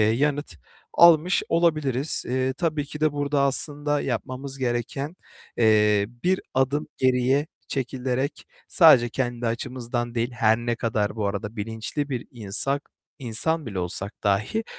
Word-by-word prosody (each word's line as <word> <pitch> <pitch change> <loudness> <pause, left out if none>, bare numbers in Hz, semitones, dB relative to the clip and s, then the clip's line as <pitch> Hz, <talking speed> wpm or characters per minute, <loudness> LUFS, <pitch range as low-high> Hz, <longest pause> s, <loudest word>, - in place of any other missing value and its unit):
yanıt 135 - +1 0.4
almış 170 +1 +6
olabiliriz. 155 -5 +1
Eee, 130 +1 0
tabii 155 -4 0
ki 150 +1 -8
de 155 -1 +2
burada 145 0 0
aslında 145 +1 0
yapmamız 135 +1 -4
gereken, 130 +5 -2 0.4
eee, 105 -3 +4 0.2
bir 185 +1 +2
adım 135 +3 +1
geriye 130 +3 +2 0.2
çekilerek 130 +1 -3 0.2
sadece 140 -9 +6
kendi 120 -1 -2
açımızdan 120 0 -3
değil, 120 +1 -1
her 110 -2 +3
ne 120 0 -2
kadar 110 -2 -1
bu 105 -2 -1
arada 105 +2 -4
bilinçli 110 +7 -4
bir 125 -3 -3
insan- 125 +5 -1 0.3
insan 145 +6 0
bile 100 -5 -4
olsak 95 +4 -4
dahi, 105 - +1
130 Hz, 130 wpm, -24 LUFS, 115-145 Hz, 0.4 s, almış